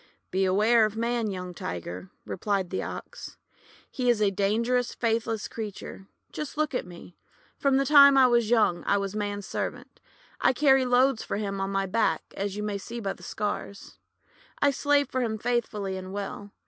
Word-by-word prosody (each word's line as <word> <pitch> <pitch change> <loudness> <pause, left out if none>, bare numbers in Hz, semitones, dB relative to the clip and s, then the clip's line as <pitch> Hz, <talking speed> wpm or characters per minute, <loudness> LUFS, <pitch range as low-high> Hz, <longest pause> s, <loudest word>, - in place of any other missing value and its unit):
"Beware 200 +5 +3
of 215 0 -1
Man, 235 -1 0
young 180 -2 -5
Tiger," 90 - -6 0.2
replied 195 -2 -2
the 190 - -1
Ox. - - -8 0.5
"He 250 -3 0
is 235 -3 +3
a 205 -2 +3
dangerous, 230 +5 0
faithless 225 -2 -1
creature. 205 -3 -7 0.2
Just 300 0 -6
look 310 -2 0
at 250 - -2
me. 175 0 -13 0.4
From 275 -1 +3
the 275 - +2
time 280 -1 +8
I 265 - +7
was 240 -3 +3
young, 215 -7 +3
I 200 - +3
was 200 0 -3
Man's 205 -1 -3
servant. - - -5 0.4
I - - +3
carried 270 -1 +4
loads 250 -1 +3
for - - -3
him 195 -2 -3
on 195 - -1
my 195 0 0
back, 190 -4 +1
as 200 0 -3
you 210 - -3
may 205 -1 -2
see 235 +5 -7
by 195 -4 -2
these - - -12
scars. 205 -1 -5 0.6
I 285 - +4
slaved 285 0 +1
for 260 - 0
him 220 -3 -1
faithfully 215 -4 -2
and 185 0 -7
well. 200 0 -5
215 Hz, 180 wpm, -27 LUFS, 195-245 Hz, 0.6 s, time